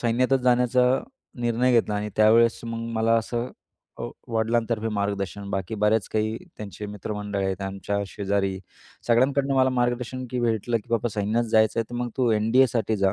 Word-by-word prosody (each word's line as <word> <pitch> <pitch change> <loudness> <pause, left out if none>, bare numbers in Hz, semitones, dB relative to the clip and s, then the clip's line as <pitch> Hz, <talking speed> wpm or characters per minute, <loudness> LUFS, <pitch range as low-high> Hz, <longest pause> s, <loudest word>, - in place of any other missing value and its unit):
सैन्यातच 125 +3 +2
जाण्याचा 125 0 +3 0.5
निर्णय 120 +2 +2
घेतला 115 -3 +2
आणि 105 +1 -2
त्यावेळेस 115 +2 +5
मग 115 0 -4
मला 110 0 +2
असं 120 +2 -3 0.5
अ, - - -6 0.3
वडिलांतर्फे 115 0 0
मार्गदर्शन, 100 -1 -3
बाकी 95 +2 -3
बऱ्याच 105 0 +1
काही 110 0 0 0.2
त्यांचे 105 0 -7
मित्रमंडळ 105 0 -4
आहेत, 95 -1 -2
आमच्या 95 +1 -3
शेजारी 100 -1 -1 0.5
सगळ्यांकडनं 135 +3 +3
मला 130 0 +4
मार्गदर्शन 125 0 -1
की 125 -1 -2
भेटलं, 115 0 0
की 115 +1 -7
बाबा 115 0 +1
सैन्यात 110 +3 0
जायचं 110 +1 +4
आहे - - -2
तर - - -6
मग 120 - -2
तू 125 -3 +3
एन-डी-एसाठी 115 +1 +2
जा, 95 -1 +2
115 Hz, 160 wpm, -25 LUFS, 105-120 Hz, 0.5 s, त्यावेळेस